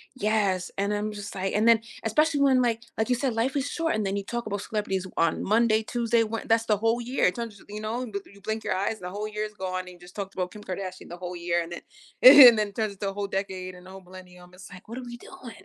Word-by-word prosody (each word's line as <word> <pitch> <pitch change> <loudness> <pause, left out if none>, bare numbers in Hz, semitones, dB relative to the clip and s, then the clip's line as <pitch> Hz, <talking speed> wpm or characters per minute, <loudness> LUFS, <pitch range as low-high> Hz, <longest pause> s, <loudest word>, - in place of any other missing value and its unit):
yes, 205 -6 0
and 200 +1 0
I'm 210 +1 -2
just, 205 -1 -8
like 190 0 -2
and 215 +2 +2
then, 230 -1 +6 0.2
especially 295 +7 +2
when, 265 -2 +4
like 230 -2 0 0.2
like 220 +3 0
you 250 - +3
said, 255 0 -1
life 235 +5 -1
is 280 +1 -1
short 330 -3 -1
and 215 - -1
then 195 +1 -1
you 200 - -2
talk 240 +3 -4
about 200 0 -3
celebrities 195 -3 -2
on 165 -1 +1
Monday, 220 +1 +3
Tuesday, 235 0 +1
We 225 +1 -3
that's 225 0 +2
the 210 -2 +2
whole 225 +3 +1
year, 250 +3 0
it 180 - +2
turns, 230 -4 -6
you 210 +1 -7
know, 235 +4 -3 0.2
you 200 0 -18
blink 220 +2 -3
your - - -1
eyes 195 +4 0
and 215 - -18
the 180 - -4
whole 205 +3 -4
year 210 0 -4
is 210 0 -6
gone 185 -2 -3
and 185 - -12
you 180 -1 -14
just 175 0 -15
talked 195 -1 -5
about 180 -1 -3
Kim 210 - -11
Kardashian 185 -1 -6
the 175 - -8
whole 180 0 -6
year 175 0 0
and 170 +1 -7
then - - -7 0.4
and 255 -3 +11
then 210 -1 0
it 200 - -18
turns 215 -3 -1
into 195 0 -3
a - - -6
whole 200 0 -3
decade 190 -1 -4
and 180 0 -15
the 185 - -12
whole 190 0 -10
millennium, 180 -1 -14
it's, 185 0 -13
like, 180 +2 -13
what 230 - -7
are 255 - -6
we 240 -1 -8
doing? 240 0 -12
210 Hz, 285 wpm, -26 LUFS, 185-230 Hz, 0.4 s, and